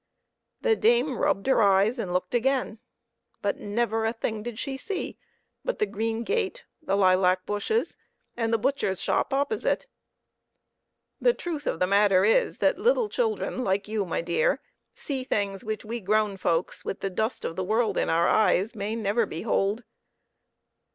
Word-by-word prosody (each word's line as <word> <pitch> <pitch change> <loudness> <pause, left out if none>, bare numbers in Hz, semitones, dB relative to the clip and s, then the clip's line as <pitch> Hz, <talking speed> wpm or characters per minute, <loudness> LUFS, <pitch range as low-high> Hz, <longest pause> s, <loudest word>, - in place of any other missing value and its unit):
The 460 -3 +3
dame 240 - +2
rubbed 195 - +1
her 265 -3 +3
eyes 200 +4 +3
and 190 -6 -3
looked 180 +2 -1
again, 245 -2 0 0.6
but 200 - -1
never 225 +1 -1
a 225 +1 0
thing 220 -2 -3
did 235 0 -6
she 275 +1 -3
see 375 +8 -5 0.4
but - - -2
the 425 - +2
green 225 - -2
gate, 450 - -2 0.2
the 290 -10 0
lilac 185 -1 +3
bushes, 205 - -1 0.4
and 230 -1 -1
the 230 - +3
butcher's 215 -6 0
shop - - 0
opposite. 280 +10 0 1.3
The - - +3
truth 315 -4 -5
of - - 0
the 180 - +3
matter 200 0 +4
is, 225 - +2
that - - +2
little 485 -2 +2
children 440 - -1
like 195 0 0
you, 215 -1 -1
my 170 -3 -2
dear, 175 - +1 0.3
see 270 -3 -4
things 200 -5 -2
which 215 -1 -4
we 235 +2 -4
grown 210 0 +1
folks, 175 -2 -1
with 195 - -5
the 195 - -2
dust 220 +6 -2
of 165 - -3
the 185 - -2
world 215 +1 +1
in - - 0
our 170 +1 +3
eyes, 205 0 +3
may 210 0 -3
never 220 0 +1
behold. 200 +5 -1
220 Hz, 165 wpm, -26 LUFS, 195-260 Hz, 1.3 s, matter